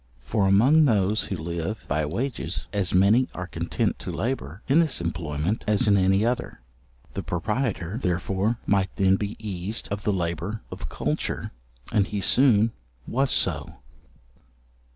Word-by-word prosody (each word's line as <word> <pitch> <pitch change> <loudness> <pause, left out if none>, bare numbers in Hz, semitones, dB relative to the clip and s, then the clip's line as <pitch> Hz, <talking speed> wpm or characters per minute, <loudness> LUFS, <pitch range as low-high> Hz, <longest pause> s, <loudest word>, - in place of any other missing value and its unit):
For 100 - +1
among 130 +11 +5
those 105 -3 +2
who 95 - -3
live 85 +5 -4
by 75 +1 0
wages, 125 - -3
as 100 -3 0
many 100 +7 +4
are 90 - -4
content 90 - -2
to - - -5
labour 70 - -3
in 145 +5 +5
this 160 -6 +1
employment 85 +2 -2
as 105 0 +3
in 100 - +5
any 95 +2 +3
other. 120 +1 -2 0.5
The - - -3
proprietor, 105 0 -2
therefore, 95 +4 0
might 95 -2 +2
then 95 -1 +4
be 100 +1 -3
eased 105 0 -5
of 100 0 -3
the 105 - +1
labour 95 +4 -2
of - - -6
culture, - - -2 0.4
and 105 -4 +2
he 105 - -3
soon 115 0 +4 0.3
was 135 +3 +1
so. - - 0
100 Hz, 150 wpm, -25 LUFS, 90-110 Hz, 0.5 s, among